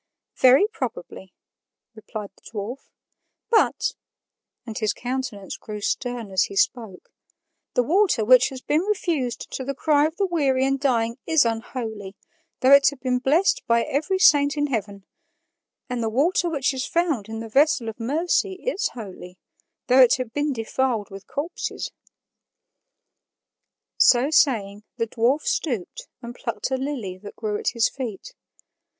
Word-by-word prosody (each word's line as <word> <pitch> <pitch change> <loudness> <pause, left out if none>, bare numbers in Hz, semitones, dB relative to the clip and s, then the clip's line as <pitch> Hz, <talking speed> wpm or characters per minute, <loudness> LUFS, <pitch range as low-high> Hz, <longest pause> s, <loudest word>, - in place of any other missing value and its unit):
"Very 260 +9 +6
probably," 240 - -6 0.6
replied 215 -1 -8
the - - -26
dwarf, 230 +5 -7 0.6
"but" 485 +2 +2 0.7
(and 225 -2 -7
his 215 -2 0
countenance 245 -6 -5
grew 210 -1 -7
stern 240 0 -3
as 190 -2 +3
he 200 - -9
spoke) 215 -3 -1 0.6
"the 250 - +3
water 345 - +2
which 255 +2 +6
has 260 -1 -9
been 300 +4 +1
refused 340 - -2
to 265 - -4
the 275 +1 -4
cry 295 +1 +3
of 320 - -9
the 400 - +1
weary 275 -7 +1
and 270 0 0
dying 235 -3 0
is 320 -5 +4
unholy, 225 -3 -4 0.5
though 260 - +4
it 280 0 +8
had 285 -3 -11
been 250 -1 0
blessed 305 +9 +2
by 235 0 +3
every 315 +8 -1
saint 290 -4 +4
in 290 - +1
heaven; 200 -3 -4 0.8
and 250 -1 -3
the 225 - 0
water 330 +9 +1
which 280 -4 0
is 260 0 -3
found 310 - 0
in 225 0 -5
the 225 - -6
vessel 270 0 +2
of 225 +1 -6
mercy 330 - 0
is 440 +3 -2
holy, 185 -5 -9 0.5
though 255 +1 +5
it 250 -2 +6
had 255 -3 -5
been 290 0 0
defiled 230 -3 -2
with 195 0 -10
corpses." 300 +5 -4 2.1
So 255 +4 +5
saying, 210 -10 +2 0.2
the 230 - 0
dwarf 240 +6 +1
stooped 300 - -3 0.2
and 235 0 -7
plucked 255 - -4
a - - +2
lily 250 -9 -4
that 205 +1 -11
grew 210 -2 -3
at - - -1
his 235 -2 +3
feet. 260 - -7
255 Hz, 155 wpm, -23 LUFS, 225-290 Hz, 2.1 s, it